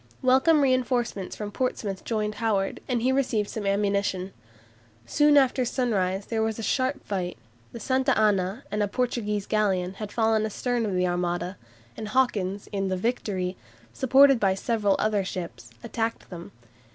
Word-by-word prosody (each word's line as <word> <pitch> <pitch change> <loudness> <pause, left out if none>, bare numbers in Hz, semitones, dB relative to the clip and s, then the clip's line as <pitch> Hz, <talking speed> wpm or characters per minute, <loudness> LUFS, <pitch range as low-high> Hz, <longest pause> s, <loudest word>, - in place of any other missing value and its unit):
Welcome 265 +5 +4
reinforcements 250 -7 0
from 210 -1 -5
Portsmouth 210 -5 -3
joined 215 -2 -1
Howard, 205 -4 0
and 240 -3 -1
he 260 - +3
received 245 -6 0
some 210 -3 -4
ammunition. 200 -2 0 0.7
Soon 295 - +4
after 265 -1 +3
sunrise 200 -6 -1
there 225 -1 -2
was 220 -1 -1
a 225 - -5
sharp 260 +4 -1
fight. 185 -3 -3 0.3
The 235 - -8
"Santa 260 +3 +1
Ana" 205 +1 +1
and 210 - -1
a 205 - +2
Portuguese 210 -3 -2
galleon 190 -4 0
had 205 +1 -7
fallen 220 -1 +2
astern 230 +2 -1
of 195 - -2
the 180 0 +2
Armada, 175 +1 -2 0.4
and 215 - -6
Hawkins, 205 -5 0
in 195 -1 -1
the 185 0 -1
"Victory," 190 -4 -2 0.4
supported 270 0 +5
by 195 -2 +2
several 205 -1 +1
other 210 -2 +1
ships, 170 -11 -6
attacked 225 -2 -3
them. 170 -1 -8
215 Hz, 155 wpm, -26 LUFS, 195-245 Hz, 0.7 s, supported